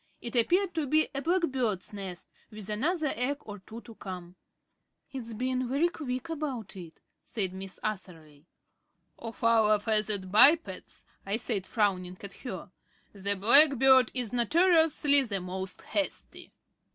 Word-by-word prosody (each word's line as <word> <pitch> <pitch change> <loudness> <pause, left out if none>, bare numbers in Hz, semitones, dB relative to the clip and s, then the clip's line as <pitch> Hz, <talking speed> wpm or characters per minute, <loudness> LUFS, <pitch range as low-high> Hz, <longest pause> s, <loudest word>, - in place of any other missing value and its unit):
It 235 +1 -7
appeared 355 - +2
to 315 -4 -2
be 310 +3 +2
a 275 - -3
black 350 +4 0
bird's 235 - -2
nest 190 -3 -8 0.2
with 215 -2 -10
another 300 - -1
egg 265 +4 -2
or 205 -1 -10
two 220 +5 -11
to 235 - -13
come. 180 -4 -9 0.8
"It's 235 -4 -7
been 255 +1 -2
very 290 +7 +1
quick 255 -4 -6
about 285 -11 -5
it," 170 -4 -11 0.2
said 190 -5 -2
Miss 190 0 -8
Atherley. 165 -7 -7 0.7
"Of 230 0 -9
our 220 -2 +4
feathered 210 -3 -2
bipeds," 295 - +4 0.2
I 200 +2 -1
said, 220 -4 -1
frowning 185 -5 -1
at 200 - -8
her, 190 -7 -8 0.4
"the 200 0 -3
blackbird 265 +3 +6
is 245 -3 -1
notoriously 315 - +3
the 215 -7 -3
most 185 +1 -7
hasty." 300 -2 -4
230 Hz, 140 wpm, -28 LUFS, 195-275 Hz, 0.8 s, blackbird